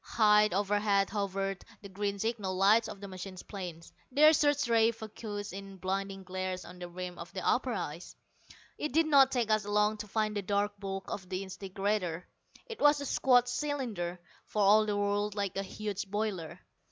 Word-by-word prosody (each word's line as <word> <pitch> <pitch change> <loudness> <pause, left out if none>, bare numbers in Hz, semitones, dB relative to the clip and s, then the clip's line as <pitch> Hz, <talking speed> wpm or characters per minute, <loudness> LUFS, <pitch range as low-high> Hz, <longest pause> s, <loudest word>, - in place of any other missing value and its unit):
High 210 -1 +4
overhead 200 0 +1
hovered 195 -1 -2 0.2
the - - -7
green 200 +1 -3
signal 210 -3 -2
lights 205 +4 +4
of 200 - -9
the 200 - -6
machine 185 0 -8
planes, 175 -5 -7 0.2
their 305 +4 +7
search 290 -2 +2
rays 230 -1 +4
focussed 210 -2 -6
in 195 0 -8
blinding 195 +1 -3
glares 185 0 -4
on 180 +1 -11
the 175 -1 -6
rim 180 0 -6
of - - -8
the - - -3
upper - - +2
ice. - - -5 0.6
It 300 - -3
did 325 +1 +4
not 275 -3 +6
take 235 -4 0
us 215 0 +3
long 210 +1 +1
to 210 - -6
find 215 +1 -1
the 205 - 0
dark 205 +1 0
bulk 195 -1 -5
of 185 -2 -6
the 185 +1 -2
disintegrator. 190 -2 -2 0.4
It 460 -3 -9
was 290 0 +5
a 285 - -4
squat 250 -2 +4
cylinder, 245 -11 -3 0.3
for 210 - 0
all 215 +2 +6
the 205 -1 0
world 205 0 0
like 200 -3 -2
a 195 - 0
huge 200 0 -5
boiler. 205 -5 -3
205 Hz, 185 wpm, -31 LUFS, 190-220 Hz, 0.6 s, their